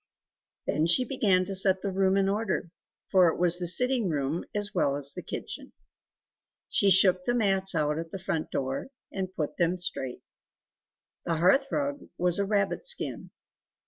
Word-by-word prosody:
Then 155 Hz, +2 st, 0 dB
she 250 Hz, +9 st, +3 dB
began 200 Hz, -8 st, +1 dB
to 195 Hz, -, -5 dB
set 190 Hz, 0 st, +2 dB
the 200 Hz, -, -2 dB
room 190 Hz, 0 st, +2 dB
in 195 Hz, -1 st, +2 dB
order, 195 Hz, -4 st, -2 dB, 0.4 s
for 185 Hz, -3 st, +5 dB
it 165 Hz, -, 0 dB
was 175 Hz, 0 st, +4 dB
the 175 Hz, -, -1 dB
sitting 250 Hz, +2 st, +3 dB
room 150 Hz, +2 st, -2 dB
as 205 Hz, 0 st, -1 dB
well 140 Hz, -, +1 dB
as 140 Hz, -1 st, -2 dB
the -, -, -7 dB
kitchen. -, -, -6 dB, 1.0 s
She 200 Hz, -, +3 dB
shook 185 Hz, -1 st, +5 dB
the 245 Hz, -, +1 dB
mats 195 Hz, -4 st, +2 dB
out 150 Hz, 0 st, 0 dB
at 165 Hz, 0 st, -6 dB
the 195 Hz, -, -6 dB
front 165 Hz, -4 st, -3 dB
door 135 Hz, -, -3 dB, 0.2 s
and 190 Hz, -1 st, -4 dB
put 150 Hz, -2 st, -3 dB
them 175 Hz, +1 st, +1 dB
straight; 135 Hz, -8 st, -4 dB, 1.0 s
the 170 Hz, -, -1 dB
hearth 190 Hz, -, +3 dB
rug 285 Hz, 0 st, -3 dB
was 180 Hz, +1 st, +1 dB
a 200 Hz, -, +1 dB
rabbit 200 Hz, -, 0 dB
skin. 485 Hz, -1 st, -3 dB
185 Hz, 175 wpm, -27 LUFS, 165-200 Hz, 1.0 s, for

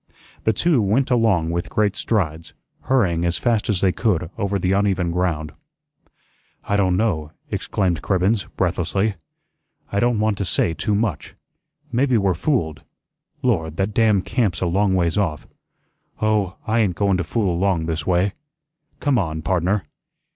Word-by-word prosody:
The 110 Hz, -, +4 dB
two 145 Hz, -, +2 dB
went 115 Hz, +7 st, +1 dB
along 105 Hz, -9 st, +2 dB
with 85 Hz, +1 st, -2 dB
great 105 Hz, -2 st, +1 dB
strides, 80 Hz, -7 st, -1 dB, 0.3 s
hurrying 95 Hz, -11 st, +2 dB
as 85 Hz, 0 st, 0 dB
fast 115 Hz, -4 st, 0 dB
as 100 Hz, -4 st, +1 dB
they 95 Hz, -, +4 dB
could 90 Hz, -6 st, 0 dB
over 100 Hz, -2 st, -1 dB
the 90 Hz, 0 st, 0 dB
uneven 95 Hz, -3 st, +1 dB
ground. 85 Hz, -4 st, -1 dB, 1.1 s
"I 100 Hz, -, -1 dB
don' 95 Hz, -3 st, +2 dB
know," 80 Hz, -8 st, -1 dB, 0.2 s
exclaimed 90 Hz, -6 st, -1 dB
Cribbens, 95 Hz, +2 st, +1 dB
breathlessly, 95 Hz, +3 st, 0 dB, 0.8 s
"I 100 Hz, -, +1 dB
don' 120 Hz, +1 st, +2 dB
want 110 Hz, -1 st, 0 dB
to -, -, 0 dB
say 85 Hz, -1 st, +1 dB
too 105 Hz, +4 st, -1 dB
much. 105 Hz, -1 st, -2 dB, 0.6 s
Maybe 130 Hz, 0 st, +2 dB
we're 100 Hz, -3 st, +2 dB
fooled. 85 Hz, -, -1 dB, 0.6 s
Lord, 80 Hz, -11 st, 0 dB
that 100 Hz, +2 st, -1 dB
damn 105 Hz, -3 st, +3 dB
camp's 105 Hz, -9 st, 0 dB
a -, -, -1 dB
long 95 Hz, +2 st, +2 dB
ways 85 Hz, +1 st, +1 dB
off. 80 Hz, -7 st, -1 dB, 0.7 s
Oh, 105 Hz, -4 st, +1 dB
I 115 Hz, 0 st, +1 dB
ain't 100 Hz, -6 st, +1 dB
goin' 100 Hz, -1 st, +2 dB
to 90 Hz, -, -1 dB
fool 100 Hz, +1 st, 0 dB
along 90 Hz, -2 st, +1 dB
this 80 Hz, -1 st, -3 dB
way. 90 Hz, +2 st, +2 dB, 0.7 s
Come 140 Hz, -4 st, +2 dB
on, 80 Hz, -4 st, -3 dB
pardner." 90 Hz, +3 st, 0 dB
95 Hz, 155 wpm, -21 LUFS, 85-110 Hz, 1.1 s, The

